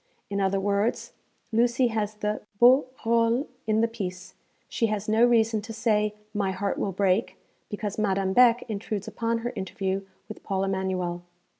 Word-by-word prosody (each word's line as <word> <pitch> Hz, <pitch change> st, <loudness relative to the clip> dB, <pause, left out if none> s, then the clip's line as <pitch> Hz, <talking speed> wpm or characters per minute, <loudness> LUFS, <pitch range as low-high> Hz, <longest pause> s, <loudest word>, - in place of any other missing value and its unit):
In 200 Hz, 0 st, 0 dB
other 195 Hz, 0 st, +1 dB
words, 205 Hz, +4 st, -1 dB, 0.4 s
Lucy 240 Hz, +2 st, +3 dB
has 215 Hz, -2 st, -2 dB
the 210 Hz, 0 st, -2 dB, 0.2 s
beau 255 Hz, +4 st, +6 dB, 0.2 s
rôle 230 Hz, +3 st, +2 dB, 0.2 s
in 215 Hz, 0 st, +2 dB
the 230 Hz, -, +3 dB
piece, 185 Hz, -5 st, -6 dB, 0.3 s
she 230 Hz, -, 0 dB
has 210 Hz, -1 st, -3 dB
no 220 Hz, +2 st, +3 dB
reason 225 Hz, -2 st, +3 dB
to 225 Hz, +2 st, -8 dB
say, 210 Hz, -2 st, +1 dB, 0.2 s
'My 205 Hz, -2 st, 0 dB
heart 200 Hz, +1 st, -2 dB
will 195 Hz, -, -1 dB
break,' 190 Hz, +3 st, +1 dB, 0.3 s
because 205 Hz, 0 st, -4 dB
Madame 195 Hz, -2 st, +1 dB
Beck 245 Hz, 0 st, +5 dB
intrudes 205 Hz, -2 st, -4 dB
upon 230 Hz, 0 st, -1 dB
her 240 Hz, -, -2 dB
interview 190 Hz, -1 st, -2 dB, 0.3 s
with 215 Hz, -, -9 dB
Paul 195 Hz, -1 st, -2 dB
Emanuel. 190 Hz, -2 st, -2 dB
210 Hz, 160 wpm, -26 LUFS, 195-230 Hz, 0.4 s, beau